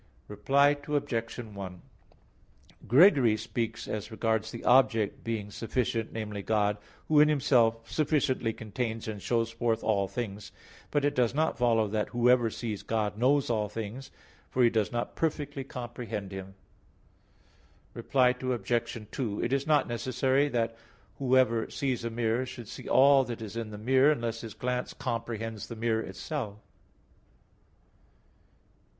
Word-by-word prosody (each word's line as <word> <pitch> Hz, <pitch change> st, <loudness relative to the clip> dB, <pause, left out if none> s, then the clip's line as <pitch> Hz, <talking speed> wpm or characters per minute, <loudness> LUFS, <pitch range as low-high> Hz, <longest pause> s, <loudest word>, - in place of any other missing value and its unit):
Reply 140 Hz, +7 st, +3 dB
Obj. 140 Hz, -6 st, -2 dB
1: 100 Hz, -6 st, -7 dB, 1.1 s
Gregory 130 Hz, -, +6 dB
speaks 115 Hz, +1 st, -4 dB
as 110 Hz, 0 st, -4 dB
regards 110 Hz, -1 st, -1 dB
the 115 Hz, -, -8 dB
object 120 Hz, -5 st, +3 dB
being 110 Hz, -3 st, -3 dB
sufficient, 115 Hz, 0 st, -2 dB
namely, 105 Hz, -2 st, -4 dB
God, 105 Hz, 0 st, +1 dB, 0.3 s
who 155 Hz, -1 st, +4 dB
in 150 Hz, +1 st, +6 dB
Himself 120 Hz, -6 st, +2 dB
sufficiently 140 Hz, -6 st, +1 dB
contains 110 Hz, +1 st, -4 dB
and 105 Hz, -2 st, -5 dB
shows 115 Hz, +1 st, 0 dB
forth 115 Hz, -1 st, -1 dB
all 100 Hz, -3 st, +1 dB
things; 100 Hz, 0 st, -5 dB, 0.4 s
but 145 Hz, -1 st, +1 dB
it 145 Hz, -, +2 dB
does 125 Hz, 0 st, +1 dB
not 155 Hz, +2 st, +1 dB
follow 115 Hz, -2 st, +2 dB
that 105 Hz, +1 st, -1 dB
whoever 120 Hz, 0 st, +3 dB
sees 110 Hz, -2 st, -4 dB
God 110 Hz, -2 st, -1 dB
knows 130 Hz, +3 st, +2 dB
all 105 Hz, -2 st, 0 dB
things, 115 Hz, +5 st, -6 dB, 0.4 s
for 125 Hz, -, +2 dB
he 120 Hz, -, +5 dB
does 110 Hz, -3 st, 0 dB
not 120 Hz, 0 st, -3 dB
perfectly 145 Hz, -3 st, -2 dB
comprehend 120 Hz, -6 st, -6 dB
Him. 95 Hz, 0 st, -8 dB, 1.4 s
Reply 130 Hz, -2 st, +2 dB
Obj. 120 Hz, -3 st, -2 dB
2: 110 Hz, -6 st, -2 dB
It 120 Hz, -, 0 dB
is 140 Hz, +2 st, 0 dB
not 150 Hz, -3 st, +3 dB
necessary 130 Hz, +4 st, +1 dB
that 115 Hz, -3 st, -1 dB, 0.4 s
whoever 130 Hz, -4 st, +3 dB
sees 130 Hz, -4 st, -2 dB
a 115 Hz, -, -2 dB
mirror 115 Hz, +2 st, 0 dB
should 120 Hz, -2 st, -8 dB
see -, -, -8 dB
all 135 Hz, 0 st, +6 dB
that 120 Hz, -2 st, -5 dB
is 110 Hz, -1 st, -7 dB
in 115 Hz, -2 st, -4 dB
the 105 Hz, -, -8 dB
mirror, 130 Hz, +6 st, +4 dB
unless 115 Hz, -5 st, -2 dB
his 110 Hz, -3 st, -8 dB
glance 125 Hz, +1 st, -3 dB
comprehends 115 Hz, -3 st, -4 dB
the 115 Hz, -, -7 dB
mirror 110 Hz, 0 st, 0 dB
itself. 115 Hz, -6 st, -5 dB
115 Hz, 145 wpm, -29 LUFS, 110-130 Hz, 1.4 s, Gregory